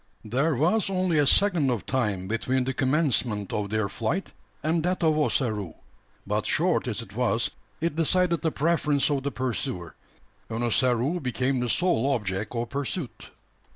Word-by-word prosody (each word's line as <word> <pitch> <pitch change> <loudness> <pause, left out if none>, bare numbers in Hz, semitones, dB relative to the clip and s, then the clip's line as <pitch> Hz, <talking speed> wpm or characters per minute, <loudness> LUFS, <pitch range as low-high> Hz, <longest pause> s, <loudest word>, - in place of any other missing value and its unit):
There 135 +8 +1
was 180 - +2
only 185 -4 +1
a 145 - +3
second 175 -5 +4
of 120 -5 -1
time 105 -8 -1
between 125 +4 0
the 130 +1 -2
commencement 130 - +1
of 105 -1 -2
their 110 -1 0
flight 115 - -3 0.3
and 160 +2 +1
that 180 +2 -1
of 160 -1 +4
Ossaroo; 110 - 0 0.5
but - - -1
short - - +2
as - - -2
it - - -15
was, - - +1 0.3
it 165 -1 -1
decided 170 +1 +2
the 160 - 0
preference 150 -2 +1
of 140 -2 +1
the 140 - -2
pursuer, 105 -10 -3 0.6
and 115 +1 -2
Ossaroo 125 - +2
became 130 -1 -1
the 125 0 -1
sole 140 -4 +2
object 105 +1 -3
of 115 0 -3
pursuit. 140 +1 -4
130 Hz, 160 wpm, -26 LUFS, 115-160 Hz, 0.6 s, second